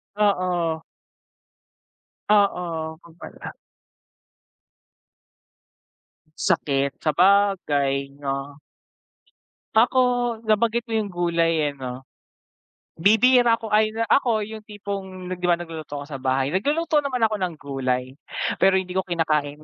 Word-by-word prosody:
Oo. 180 -6 +1 1.5
Oo, 170 -6 +1
yun 170 -1 -16
pala. - - -9 2.8
Sakit, 140 -1 0
sabagay 155 -7 +2
'no. 140 +1 -4 1.2
Ako, 240 +4 +4 0.5
nabanggit 230 +2 +1
mo 225 - -5
yung 210 -3 -1
gulay 170 -3 +1
eh, - - -14
'no? 130 -1 -7 1.0
Bibihira 235 +4 +5
ako 225 -1 -8
ay, 215 0 +4 0.2
ako 225 -3 +2
yung 220 0 -8
tipong 195 -3 -6
'di 180 0 -4
ba, 175 -1 +4
nagluluto 160 -4 -7
ako 140 - -6
sa 140 -2 -7
bahay, 130 +2 0
nagluluto 300 - +1
naman 255 -5 -2
ako 215 -1 0
ng 180 -2 -2
gulay, 130 -2 -2 0.5
pero 190 0 +5
hindi 185 -1 -3
ko 190 - +1
kinakain. 155 -3 -1
180 Hz, 105 wpm, -23 LUFS, 145-210 Hz, 2.8 s, Bibihira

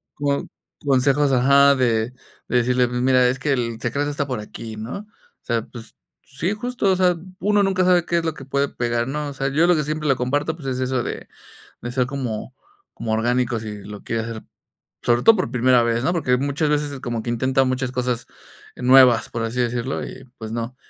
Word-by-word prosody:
co 140 -1 -1 0.4
consejos 140 +1 +3
Ajá, 140 +2 +5
de 120 -3 +1 0.4
de 125 - +2
decirle: 125 +1 +2
"Mi 125 0 -2
mira, 125 -1 +4
es 130 +2 -1
que 140 +1 0
el 115 -3 -2
secreto 140 +5 -1
está 145 -1 -2
por 125 -4 -3
aquí, 110 +1 -8
¿no?" 110 +3 -5
O 210 - -12 0.4
sea, 115 -1 +1
pues, 115 -1 -12 0.3
sí, 155 +8 -3
justo, 230 -2 -1
o - - +3
sea, 180 -1 +2 0.2
uno 205 +2 +2
nunca 190 -1 +1
sabe 180 -2 +4
qué 170 - 0
es - - -4
lo 160 - 0
que 135 - -10
puede 140 +1 0
pegar, 120 0 -1
¿no? 150 +2 -3
O - - -7
sea, 135 0 -2
yo 150 +5 +3
lo 175 - +5
que 155 - 0
siempre 155 +1 -3
le 135 - +4
comparto, 145 +6 -1
pues, 150 -5 -9
es 130 -1 -2
eso 130 -1 0
de - - -6 0.6
de 120 - -5
ser 125 -1 +1
como 130 -3 -4 0.4
como 115 -1 -4
orgánico 120 +2 +1
si 105 -1 -6
lo 105 0 -9
quiere 115 -1 -2
hacer, 115 -1 -6 0.6
sobre 120 0 +2
todo 225 - +7
por 185 - -2
primera 125 0 +4
vez, 115 0 0
¿no?, 175 - +1
porque 145 -7 +1
muchas 140 +3 -1
veces 145 -2 -1
como 120 -3 -3
que 120 - -4
intenta 130 +3 +2
muchas 130 0 -1
cosas 125 -2 -2 0.5
nuevas, 125 -2 +5
por 115 - -3
así 115 +2 -3
decirlo, 120 +2 -2
y - - -10 0.2
pues 110 -1 -6
no. 115 +2 -4
130 Hz, 215 wpm, -22 LUFS, 120-145 Hz, 0.6 s, todo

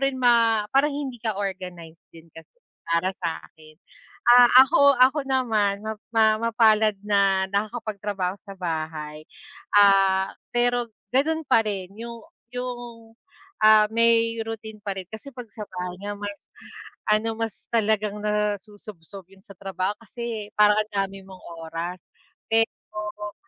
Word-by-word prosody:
rin 275 0 +1
ma 230 -3 +3
parang 285 +2 +3
hindi 265 -4 -5
ka 220 -3 -2
organize 180 -4 -6
din 165 0 -16
kasi, 165 - -15 0.3
para 170 +3 +1
sa'kin. 160 -2 -7 0.6
Ah, 245 0 +8 0.2
ako 280 -1 +4
ako 260 +4 +5
naman 220 -7 +1
map 220 -1 -5
ma 220 -1 +3
mapalad 220 -2 +3
na 200 -2 +2
nakakapagtrabaho 205 -3 -3
sa 195 -2 -10
bahay. 155 -3 -5 0.5
Ah, 195 -1 +5 0.2
pero 245 0 +1 0.2
ganun 315 +4 +1
parin 210 -8 0
yung 235 0 -8 0.3
yung, 240 -2 -7 0.5
ah, 215 0 +7
may 230 0 +3
routine 220 -1 -8
pa 200 -2 -4
rin, 185 - -7
kasi 220 +6 -9
'pag 245 -2 -9
sa 215 - -6
bahay 180 -1 -5
nga 205 0 -4
mas 205 -1 -6 0.7
ano, 220 +1 +2
mas 225 -2 -5
talagang 215 -2 +1
nasusubsob 205 -3 -4
yun 195 0 -20
sa - - -24
trabaho 195 0 -2
kasi, 230 -2 -6
parang 210 0 +5
ang 215 0 -2
dami 195 0 -2
mong 190 -1 -13 0.3
oras. 170 +3 -5 0.6
Eh 225 0 +5 0.3
oo, 210 -1 -6
210 Hz, 135 wpm, -24 LUFS, 195-230 Hz, 0.7 s, Ah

